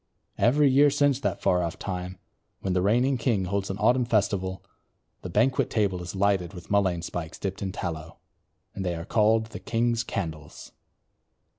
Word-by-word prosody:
'" - - -45
Every 145 +3 +4
year 140 +2 +5
since 145 -1 +2
that - - -2
far 90 -1 +3
off 85 -2 -3
time 90 -1 -5 0.4
when 95 - -1
the 90 - +2
reigning 120 +7 +2
king 110 -5 +1
holds 100 +1 -2
an 95 - -3
autumn 125 +2 +3
festival, 100 -4 0 0.6
the 90 - -6
banquet 120 +9 +2
table 100 -5 0
is 90 +2 -7
lighted 95 -2 +1
with 90 - -10
mullein 95 -4 +2
spikes 85 -2 -5
dipped 95 -1 -4
in 95 -1 -2
tallow, 80 -3 -5 0.6
and 95 - -4
they 90 -2 -1
are 85 0 -6
called 110 +1 +2
the - - -7
"King's 115 0 0
Candles." 80 -6 -6
100 Hz, 175 wpm, -26 LUFS, 90-115 Hz, 0.6 s, year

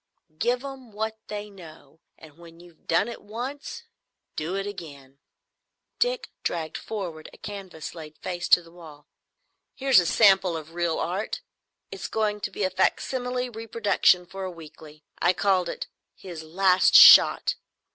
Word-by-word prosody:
"Give 245 - 0
'em 265 -5 -9
what 220 +1 -4
they 210 0 -6
know, 165 -4 -15 0.2
and 160 0 -16
when 165 -1 -15
you've 175 -2 -19
done 205 - +2
it 235 - -8
once 265 - -7 0.5
do 165 +5 -3
it 195 0 -2
again." 140 -9 -10 0.8
Dick - - -1
dragged 160 -2 -3
forward 175 -8 -6
a - - -16
canvas 195 -6 -8
laid 155 -2 -11
face 175 -1 -5
to 175 - +6
the 165 - -17
wall. 155 -4 -14 0.7
"Here's 270 -5 +4
a 175 - 0
sample 190 -5 +4
of 160 +1 -10
real 170 -1 -1
Art. 190 +5 -3 0.5
It's 185 -2 -6
going 210 0 -1
to - - -3
be 205 - -4
a 185 - 0
facsimile 250 +6 -1
reproduction 220 -5 +1
for 190 +2 -8
a 185 - -3
weekly. 155 -2 -13 0.2
I 175 - +3
called 185 -2 +1
it - - -5 0.3
"His 175 -4 -9
Last 185 +3 +3
Shot." - - +8
185 Hz, 155 wpm, -25 LUFS, 165-215 Hz, 0.8 s, Shot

